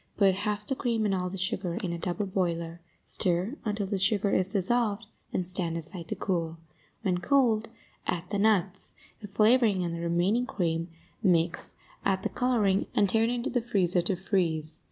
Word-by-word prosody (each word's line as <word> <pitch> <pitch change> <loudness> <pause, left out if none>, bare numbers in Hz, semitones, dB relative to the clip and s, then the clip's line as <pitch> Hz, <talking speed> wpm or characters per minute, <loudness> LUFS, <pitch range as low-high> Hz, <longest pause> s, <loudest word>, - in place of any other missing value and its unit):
Put 195 -2 +5
half 205 +2 -2
the 270 - 0
cream 230 -4 0
and 200 - +1
all 180 -1 -1
the 195 - -6
sugar 185 -1 -1
in 185 -5 -3
a 170 - -4
double 180 +4 -2
boiler; 170 -3 -2 0.2
stir 185 +8 +1
until 210 -2 -1
the 195 0 -2
sugar 200 +1 +2
is 185 +1 +1
dissolved 215 +2 +1 0.3
and 185 - -1
stand 175 -2 -1
aside 165 +1 -8
to - - -3
cool; 165 -3 -2 0.5
when 180 -4 +1
cold, 225 -2 +2 0.4
add 175 0 -2
the 205 - 0
nuts, 200 -2 +1 0.3
the 205 - -8
flavoring 215 -1 +3
and 170 -1 -2
the 170 - -4
remaining 180 +8 +1
cream, 165 -8 -1 0.3
mix, 170 -4 +1 0.3
add 190 -1 +1
the - - 0
coloring, 220 -6 +1
and 200 -2 +3
turn 225 +3 +3
into 240 0 -2
the 245 - +1
freezer 190 -7 +3
to 185 +2 0
freeze. 165 -5 0
190 Hz, 180 wpm, -28 LUFS, 175-215 Hz, 0.5 s, Put